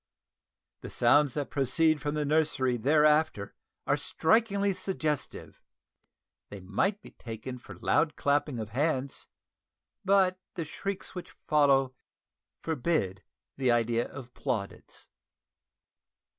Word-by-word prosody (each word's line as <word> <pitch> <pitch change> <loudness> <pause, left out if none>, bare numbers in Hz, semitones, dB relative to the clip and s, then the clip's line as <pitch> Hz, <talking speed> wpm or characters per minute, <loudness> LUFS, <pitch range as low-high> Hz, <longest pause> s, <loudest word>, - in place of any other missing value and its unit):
The - - -8
sounds 140 +3 +3
that 145 -2 -3
proceed 150 +3 +2
from 150 0 -2
the 150 -1 -1
nursery 145 -4 +1
thereafter 150 -3 +2 0.3
are - - +2
strikingly 200 +2 +1
suggestive: 180 -6 -4 0.9
they 100 - -8
might 145 - -1
be - - -13
taken 120 +2 -8
for - - -12
loud 150 0 +1
clapping 145 -2 0
of 110 -1 -5
hands, 135 +1 -1 0.8
but 190 -1 +3 0.2
the 170 -3 -3
shrieks 195 +5 -5
which 180 - -8
follow 140 -3 +3 0.7
forbid 140 - -1 0.4
the 130 -2 +1
idea 120 0 +2
of 125 -3 -10
plaudits. 100 -4 -5
145 Hz, 110 wpm, -29 LUFS, 125-160 Hz, 0.9 s, sounds